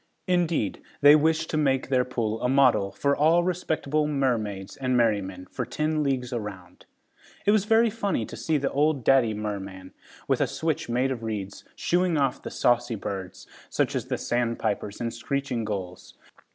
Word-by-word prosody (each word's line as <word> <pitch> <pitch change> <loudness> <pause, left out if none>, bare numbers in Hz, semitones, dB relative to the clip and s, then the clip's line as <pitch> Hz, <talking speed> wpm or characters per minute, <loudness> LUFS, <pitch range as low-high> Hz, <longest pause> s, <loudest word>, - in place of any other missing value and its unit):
Indeed 170 - 0 0.2
they 145 +1 +9
wished 160 +1 +1
to 155 - 0
make 135 -3 +1
their 130 -2 +3
pool 115 -3 -2
a 125 - +1
model, 125 -7 +4
for 140 +8 +1
all 165 +4 +4
respectable 155 -4 -1
mermaids 110 -9 -1
and 130 -2 0
merrymen, 100 -5 0
for - - -3
ten 155 0 -1
leagues 130 -4 -1
around. 100 -6 -7 0.6
It 205 - +5
was 210 -2 +3
very 225 +1 +4
funny 200 - -1
to - - -9
see 160 -2 0
the 140 -1 -1
old 145 -2 +1
daddy 120 -4 +4
merman, 100 -3 -6 0.3
with - - +1
a - - +3
switch 160 -6 -2
made 125 +3 +1
of 125 -3 -4
reeds, 105 -3 -5
shooing 175 -2 +1
off 135 -3 0
the - - -6
saucy 120 -1 +1
birds, 95 -2 -6 0.2
such - - 0
as - - -2
the - - -1
sandpipers 115 -4 -2
and 115 -1 -3
screeching 140 -4 -2
gulls. 95 -4 -6
125 Hz, 170 wpm, -26 LUFS, 105-150 Hz, 0.6 s, they